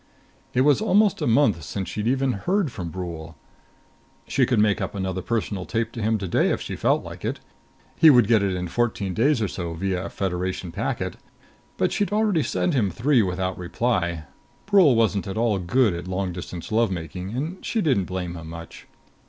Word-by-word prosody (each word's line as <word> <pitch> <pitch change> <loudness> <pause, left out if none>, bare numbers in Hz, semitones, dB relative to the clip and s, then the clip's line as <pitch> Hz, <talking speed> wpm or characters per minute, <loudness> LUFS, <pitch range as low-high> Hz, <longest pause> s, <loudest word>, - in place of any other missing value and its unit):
It 125 - +4
was 145 +7 +4
almost 210 -2 +3
a - - 0
month 115 - +3
since 95 +6 -4
she'd 105 +1 -3
even 135 +1 +2
heard 175 - 0
from 90 -6 -5
Brule. 85 -2 -7 0.9
She 130 -2 +2
could 125 - +1
make 105 -1 +3
up - - -3
another 95 -1 -2
personal 100 -3 -2
tape 115 0 -1
to 115 - -6
him 110 +1 +1
today 95 -4 +1
if - - 0
she - - -5
felt - - +1
like - - -9
it. - - -2 0.6
He 160 - +8
would 125 -6 +6
get 115 -2 +4
it 95 -2 0
in 90 0 -3
fourteen 100 -2 -1
days 120 +3 +2
or - - +1
so 85 -3 -5
via 95 +1 -2
a - - -5
Federation 90 -1 -3
packet. - - -3 0.6
But - - +1
she'd 205 - 0
already 210 -5 +2
sent 175 - 0
him 115 -8 +2
three 125 +4 +2
without 95 -1 -2
reply. 90 -3 -1 0.4
Brule 190 - +5
wasn't 110 -3 +1
at 95 - -4
all 110 -3 +1
good 100 +4 +2
at 85 +1 -6
long 95 0 -2
distance 90 0 -7
love 115 0 +3
making, 90 +3 -5
and 160 +8 -4
she 230 - -1
didn't 130 - +2
blame 90 -2 -4
him 80 -1 -8
much. 85 0 -10
100 Hz, 195 wpm, -24 LUFS, 90-125 Hz, 0.9 s, He